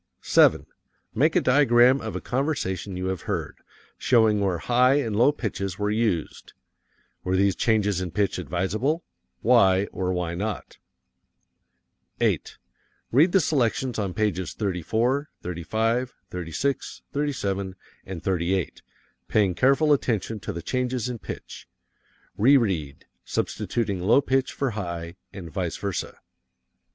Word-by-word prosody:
7. -, -, +4 dB, 0.5 s
Make -, -, +2 dB
a -, -, +4 dB
diagram 125 Hz, -1 st, +5 dB
of -, -, -5 dB
a -, -, -3 dB
conversation 100 Hz, -, -2 dB
you 90 Hz, -, -3 dB
have 95 Hz, -2 st, -5 dB
heard, -, -, -3 dB, 0.4 s
showing 110 Hz, -4 st, +4 dB
where 95 Hz, -3 st, 0 dB
high 125 Hz, +8 st, +3 dB
and 115 Hz, -8 st, 0 dB
low 120 Hz, +7 st, +5 dB
pitches 100 Hz, -8 st, -4 dB
were 105 Hz, 0 st, -1 dB
used. 105 Hz, -7 st, -2 dB, 0.7 s
Were 90 Hz, +1 st, 0 dB
these 95 Hz, -1 st, +3 dB
changes 105 Hz, -4 st, +1 dB
in 90 Hz, -, -3 dB
pitch 100 Hz, +3 st, 0 dB
advisable? 110 Hz, -, -1 dB, 0.4 s
Why 100 Hz, -5 st, +4 dB
or 90 Hz, -1 st, -2 dB
why 90 Hz, -2 st, -2 dB
not? 105 Hz, +4 st, -5 dB, 1.4 s
8. -, -, 0 dB, 0.5 s
Read 155 Hz, +9 st, +5 dB
the 195 Hz, -, +5 dB
selections 130 Hz, -5 st, 0 dB
on 95 Hz, -4 st, -2 dB
pages 95 Hz, -5 st, -1 dB
34, 115 Hz, -, -1 dB
35, 110 Hz, +8 st, -1 dB, 0.2 s
36, 90 Hz, -, -3 dB
37 100 Hz, -10 st, -2 dB, 0.3 s
and 95 Hz, -4 st, -7 dB
38, 90 Hz, 0 st, -1 dB, 0.5 s
paying 100 Hz, -4 st, +2 dB
careful 140 Hz, -, +4 dB
attention 115 Hz, -5 st, -1 dB
to -, -, -5 dB
the 85 Hz, -, -6 dB
changes 125 Hz, +1 st, -1 dB
in 120 Hz, -2 st, -5 dB
pitch. -, -, -9 dB, 0.7 s
Reread, 100 Hz, -, +2 dB, 0.2 s
substituting 100 Hz, -6 st, -2 dB
low 105 Hz, +9 st, +5 dB
pitch 135 Hz, -1 st, 0 dB
for 135 Hz, -3 st, -2 dB
high, 85 Hz, -4 st, -5 dB
and 90 Hz, -5 st, -9 dB
vice 90 Hz, 0 st, -3 dB
versa. 100 Hz, -3 st, -4 dB
105 Hz, 125 wpm, -25 LUFS, 95-125 Hz, 1.4 s, diagram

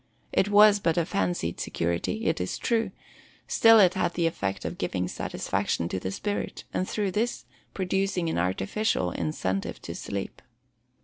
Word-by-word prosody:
It 195 Hz, -, +2 dB
was 205 Hz, 0 st, +7 dB
but 165 Hz, -4 st, +1 dB
a 170 Hz, -, +2 dB
fancied 90 Hz, -, -1 dB
security, 85 Hz, -, -2 dB
it -, -, +1 dB
is 90 Hz, -, -2 dB
true: 225 Hz, -3 st, 0 dB, 0.6 s
still 225 Hz, -1 st, +6 dB
it 185 Hz, -3 st, +6 dB
had 180 Hz, -2 st, -1 dB
the 170 Hz, -, +1 dB
effect 100 Hz, -12 st, -2 dB
of -, -, -4 dB
giving 90 Hz, 0 st, -1 dB
satisfaction 85 Hz, -1 st, -2 dB
to 95 Hz, -, -2 dB
the 95 Hz, -, -3 dB
spirit, 205 Hz, -, -3 dB
and 185 Hz, -, -1 dB
through 205 Hz, -3 st, -1 dB
this, 230 Hz, +5 st, -1 dB, 0.3 s
producing 190 Hz, -2 st, 0 dB
an 160 Hz, -, 0 dB
artificial 95 Hz, -, 0 dB
incentive 95 Hz, +5 st, -2 dB
to -, -, -5 dB
sleep. -, -, -5 dB
170 Hz, 160 wpm, -27 LUFS, -, 0.6 s, was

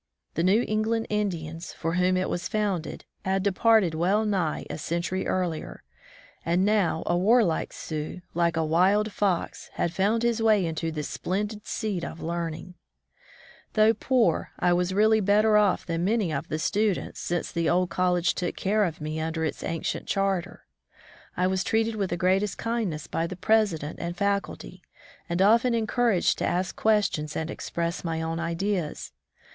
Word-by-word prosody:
The 165 Hz, -, -1 dB
New 195 Hz, +7 st, +3 dB
England 220 Hz, +1 st, 0 dB
Indians, 170 Hz, -6 st, -3 dB
for 165 Hz, +1 st, -3 dB
whom 180 Hz, +1 st, +2 dB
it 185 Hz, -, 0 dB
was 175 Hz, 0 st, -3 dB
founded, 200 Hz, -6 st, -2 dB, 0.2 s
had 190 Hz, 0 st, 0 dB
departed 205 Hz, -2 st, +3 dB
well 190 Hz, +7 st, +1 dB
nigh 185 Hz, -7 st, -1 dB
a -, -, -6 dB
century 170 Hz, +4 st, -2 dB
earlier, 175 Hz, -4 st, -2 dB, 0.6 s
and 175 Hz, +3 st, +2 dB
now 205 Hz, -6 st, +2 dB
a 175 Hz, -, +1 dB
warlike 195 Hz, -1 st, +3 dB
Sioux, 155 Hz, +2 st, -5 dB
like 170 Hz, -1 st, +1 dB
a 160 Hz, -, +1 dB
wild 195 Hz, +7 st, +3 dB
fox, 195 Hz, -4 st, -1 dB
had 170 Hz, -, -1 dB
found 210 Hz, +5 st, +1 dB
his 235 Hz, -1 st, +1 dB
way 215 Hz, -4 st, +4 dB
into 165 Hz, 0 st, -2 dB
this 150 Hz, -2 st, -4 dB
splendid 210 Hz, +3 st, -3 dB
seat 205 Hz, -6 st, -2 dB
of 165 Hz, -, -6 dB
learning! 170 Hz, +1 st, -4 dB, 1.0 s
Though 215 Hz, +1 st, +5 dB
poor, 230 Hz, -5 st, +1 dB
I 175 Hz, -, +2 dB
was 180 Hz, +1 st, +1 dB
really 215 Hz, +3 st, +4 dB
better 210 Hz, +2 st, +3 dB
off 205 Hz, -3 st, +3 dB
than 165 Hz, -1 st, -2 dB
many 200 Hz, -4 st, +1 dB
of 145 Hz, +3 st, -3 dB
the 155 Hz, -, -2 dB
students, 200 Hz, +4 st, -1 dB
since 175 Hz, 0 st, -2 dB
the 170 Hz, -1 st, 0 dB
old 180 Hz, 0 st, +1 dB
college 180 Hz, 0 st, +2 dB
took 175 Hz, -, -3 dB
care 210 Hz, +2 st, +1 dB
of 160 Hz, -3 st, -5 dB
me 155 Hz, +1 st, -3 dB
under 160 Hz, 0 st, -2 dB
its 155 Hz, -, -4 dB
ancient 165 Hz, -1 st, -3 dB
charter. 195 Hz, -2 st, -1 dB, 0.7 s
I 180 Hz, -, +2 dB
was 190 Hz, 0 st, +1 dB
treated 225 Hz, 0 st, +1 dB
with 200 Hz, -3 st, -1 dB
the 175 Hz, -, -2 dB
greatest 190 Hz, +2 st, +1 dB
kindness 220 Hz, -10 st, -2 dB
by 165 Hz, +1 st, -2 dB
the 180 Hz, -, -7 dB
president 185 Hz, -8 st, +1 dB
and 175 Hz, +1 st, -4 dB
faculty, 200 Hz, 0 st, -2 dB, 0.5 s
and 170 Hz, +2 st, +2 dB
often 235 Hz, +4 st, +4 dB
encouraged 225 Hz, -3 st, +1 dB
to -, -, 0 dB
ask 180 Hz, +1 st, -1 dB
questions 205 Hz, -9 st, +1 dB
and 160 Hz, 0 st, -3 dB
express 170 Hz, +1 st, -3 dB
my 165 Hz, -2 st, -2 dB
own 165 Hz, 0 st, -2 dB
ideas. 170 Hz, 0 st, -2 dB
185 Hz, 165 wpm, -26 LUFS, 170-210 Hz, 1.0 s, Though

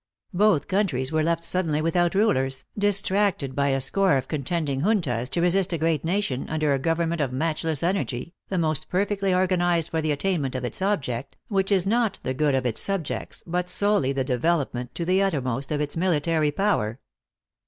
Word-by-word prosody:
Both 195 Hz, -5 st, +3 dB
countries 165 Hz, -10 st, 0 dB
were 155 Hz, 0 st, +1 dB
left 165 Hz, +1 st, 0 dB
suddenly 165 Hz, -5 st, 0 dB
without 170 Hz, +3 st, +1 dB
rulers, 135 Hz, -11 st, +1 dB
distracted 200 Hz, -7 st, +1 dB
by 140 Hz, 0 st, +1 dB
a 135 Hz, -1 st, +1 dB
score 180 Hz, +4 st, +2 dB
of 130 Hz, 0 st, -3 dB
contending 145 Hz, -2 st, -2 dB
juntas, 145 Hz, -, 0 dB
to 170 Hz, -, -1 dB
resist 180 Hz, +1 st, +2 dB
a -, -, 0 dB
great 160 Hz, 0 st, 0 dB
nation, 165 Hz, -7 st, -1 dB
under 155 Hz, -2 st, +1 dB
a 135 Hz, -, 0 dB
government 165 Hz, +2 st, 0 dB
of 135 Hz, -3 st, 0 dB
matchless 155 Hz, +2 st, -1 dB
energy, 170 Hz, -5 st, -1 dB, 0.2 s
the 190 Hz, -, -1 dB
most 155 Hz, -4 st, 0 dB
perfectly 195 Hz, +1 st, 0 dB
organized 175 Hz, -3 st, +1 dB
for 160 Hz, -, 0 dB
the 155 Hz, -1 st, 0 dB
attainment 145 Hz, -3 st, -1 dB
of 125 Hz, -1 st, -2 dB
its 120 Hz, -, -6 dB
object, 140 Hz, -, -2 dB
which 195 Hz, -1 st, 0 dB
is 190 Hz, -2 st, +3 dB
not 220 Hz, -1 st, +1 dB
the 130 Hz, -, -1 dB
good 145 Hz, +1 st, +1 dB
of 130 Hz, -1 st, 0 dB
its 120 Hz, -3 st, +1 dB
subjects, 195 Hz, -6 st, -3 dB
but 180 Hz, +1 st, -2 dB
solely 205 Hz, -10 st, +2 dB
the 135 Hz, -1 st, -1 dB
develope 140 Hz, +4 st, 0 dB
ment, 125 Hz, 0 st, -6 dB
to 170 Hz, -, -3 dB
the 185 Hz, +2 st, +2 dB
uttermost, 135 Hz, -8 st, -1 dB
of 150 Hz, -, 0 dB
its 145 Hz, -1 st, -3 dB
military 165 Hz, -3 st, +1 dB
power. 145 Hz, -, 0 dB
165 Hz, 185 wpm, -25 LUFS, 140-190 Hz, 0.2 s, Both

